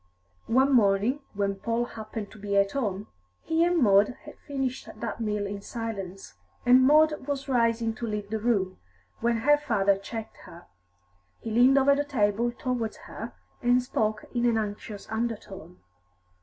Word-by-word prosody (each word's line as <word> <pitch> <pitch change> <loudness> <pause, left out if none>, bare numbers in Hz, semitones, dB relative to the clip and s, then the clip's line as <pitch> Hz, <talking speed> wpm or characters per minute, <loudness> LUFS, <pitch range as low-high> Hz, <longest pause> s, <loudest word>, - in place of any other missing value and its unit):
One 265 +4 +3
morning, 215 +3 +3 0.2
when 200 -1 -1
Paul 230 +3 -1
happened 220 -2 -7
to 215 - -13
be 200 0 -1
at 200 0 +3
home, 210 -7 -2 0.4
he 325 +1 +2
and 350 0 +2
Maud 210 -3 +4
had 300 - -9
finished 270 -3 -3
that 230 0 -4
meal 210 -2 -1
in 200 0 -5
silence, 195 - -6 0.3
and 250 +1 +7
Maud 300 +1 +4
was 280 -1 -3
rising 230 -3 +1
to 230 +1 -5
leave 210 -1 -4
the 220 - -1
room, 205 -5 0 0.4
when 235 0 +1
her 295 +4 +5
father 205 -9 +2
checked 220 +3 -7
her. 170 +1 -13 0.7
He 225 - -6
leaned 250 +4 +5
over 275 +1 +5
the 285 +1 +1
table 235 -4 +1
towards 240 -2 -3
her, - - -7 0.3
and 245 +1 +4
spoke 215 -4 -1
in 240 -1 +1
an 230 -1 +2
anxious 210 -1 -5
undertone. 220 - -4
225 Hz, 160 wpm, -27 LUFS, 205-255 Hz, 0.7 s, and